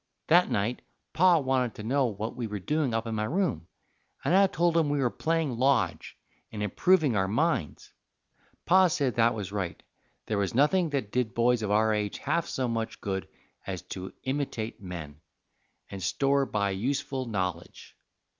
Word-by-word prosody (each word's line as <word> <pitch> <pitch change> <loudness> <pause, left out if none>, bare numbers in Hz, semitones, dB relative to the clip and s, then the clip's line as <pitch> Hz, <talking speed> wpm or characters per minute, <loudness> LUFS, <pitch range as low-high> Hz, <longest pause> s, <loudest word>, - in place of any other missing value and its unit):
That 175 +3 +5
night 105 +5 -1 0.3
Pa 180 0 +5
wanted 130 -5 0
to 105 - -8
know 135 +3 +2
what 110 +1 -4
we 120 -2 -3
were 105 -1 -4
doing 150 - -1
up 115 0 -1
in 115 - -3
my 105 0 -1
room, 170 - -1 0.6
and - - +2
I 195 0 +6
told 170 -1 +1
him 160 -3 +3
we 145 - 0
were 130 -4 +1
playing 160 -7 -1
lodge, 125 -9 +1 0.3
and 105 -1 -4
improving 150 - +3
our 95 -1 +1
minds; 110 - -1 0.6
and - - -36
Pa 185 +1 +6
said 140 -6 0
that 115 0 +3
was 100 -3 -5
right, 95 -4 -4 0.4
there 105 -2 -1
was 100 +2 -1
nothing 160 +6 +3
that 135 -8 -2
did 125 -4 -1
boys 120 0 +3
of 105 - -2
our 110 +1 +3
age 105 -1 -2
half 170 0 -1
so 130 -1 -2
much 115 -1 -3
good 95 -2 -3 0.4
as 95 -2 -4
to 95 0 -7
imitate 130 -6 -3
men, 80 -5 -8 0.7
and 95 - -6
store 135 - +1
by 100 -2 0
useful 130 +5 -2
nollidge. 90 -5 -4
120 Hz, 175 wpm, -28 LUFS, 105-145 Hz, 0.7 s, I